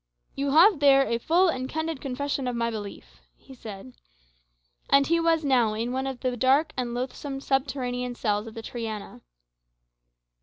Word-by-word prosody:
"You 280 +1 -2
have 330 +4 +6
there 275 -1 +5
a 235 - -1
full 345 +9 +3
and 260 -5 -2
candid 315 -2 -3
confession 275 0 -3
of 250 - -2
my 235 0 -1
belief," 205 -3 -9 0.2
he 270 - -15
said. 195 - -10 1.0
And 275 0 +5
he 335 +2 +2
was 330 -2 +2
now 240 -6 +2
in 230 +3 -2
one 265 +1 -2
of 265 -2 -6
the 255 -1 -1
dark 265 +6 +2
and 240 -2 -3
loathsome 270 +2 -4
subterranean 255 -3 -2
cells 210 -2 -1
of 220 - -10
the 225 - -7
Triana. 220 -3 -6
260 Hz, 165 wpm, -26 LUFS, 235-280 Hz, 1.0 s, have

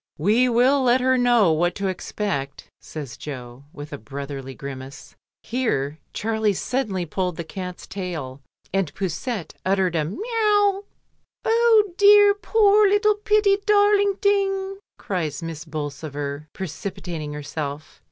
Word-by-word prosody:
"We 220 +10 +3
will 255 +4 +4
let 250 0 +4
her 260 0 +3
know 240 -7 +4
what 175 +3 +1
to 200 -1 -2
expect," 185 -6 -4
says 145 -6 -8
Jo, 125 -2 -8
with 145 0 -9
a 145 - -6
brotherly 140 -1 -7
grimace. 135 +1 -9 0.3
Here 160 - -1
Charlie 220 -2 0
suddenly 200 -6 -2
pulled 180 +1 -2
the 170 - -5
cat's 180 +2 -7
tail, 160 -9 -6 0.3
and 195 -5 0
Poussette 195 - -3
uttered 190 -2 +1
a 155 - +2
miaulL 410 - +1 0.6
"Oh 450 -4 +4
de 410 0 +7
poor 420 -2 +4
litty 415 +1 +3
pitty 420 -2 +4
darling 405 -1 +3
ting," 390 -1 0 0.2
cries 160 -6 -3
Miss 165 -1 -6
Bolsover, 145 -1 -5
precipitating 175 -3 -6
herself. 150 0 -6
190 Hz, 125 wpm, -23 LUFS, -, 0.6 s, de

